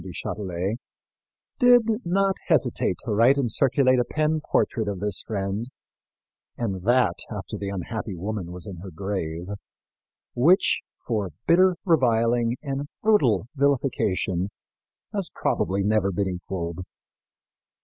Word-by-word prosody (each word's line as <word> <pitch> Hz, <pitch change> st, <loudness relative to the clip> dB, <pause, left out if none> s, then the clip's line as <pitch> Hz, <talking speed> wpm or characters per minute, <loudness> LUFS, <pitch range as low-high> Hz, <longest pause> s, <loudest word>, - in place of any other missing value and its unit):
du 90 Hz, +1 st, -8 dB
Châtelet, 95 Hz, +3 st, -3 dB, 0.8 s
did 245 Hz, -2 st, +7 dB, 0.2 s
not 195 Hz, +2 st, +2 dB
hesitate -, -, +2 dB
to -, -, -2 dB
write 115 Hz, +6 st, +5 dB
and 125 Hz, -5 st, 0 dB
circulate 130 Hz, 0 st, +3 dB
a -, -, +3 dB
pen 155 Hz, +3 st, 0 dB
portrait 110 Hz, -3 st, +1 dB
of 100 Hz, -2 st, -3 dB
this 105 Hz, -1 st, -2 dB
friend 100 Hz, +2 st, -3 dB, 0.9 s
and 100 Hz, -6 st, -2 dB
that 120 Hz, -3 st, +2 dB
after -, -, -6 dB
the 100 Hz, -, -4 dB
unhappy 100 Hz, +2 st, -4 dB
woman 95 Hz, 0 st, -4 dB
was 90 Hz, +2 st, -5 dB
in 100 Hz, -4 st, -7 dB
her 95 Hz, +3 st, -8 dB
grave 85 Hz, -2 st, -4 dB, 0.9 s
which 165 Hz, +10 st, +4 dB, 0.3 s
for 105 Hz, -5 st, -1 dB, 0.2 s
bitter 185 Hz, +2 st, +5 dB
reviling 120 Hz, -6 st, +3 dB
and 140 Hz, 0 st, -3 dB, 0.2 s
brutal 135 Hz, -, +3 dB
villification 120 Hz, -10 st, +1 dB, 0.7 s
has 200 Hz, -4 st, -1 dB
probably 95 Hz, +1 st, 0 dB
never 105 Hz, -1 st, +2 dB
been 100 Hz, +1 st, -1 dB
equalled. 90 Hz, -2 st, -4 dB
110 Hz, 125 wpm, -25 LUFS, 95-135 Hz, 0.9 s, did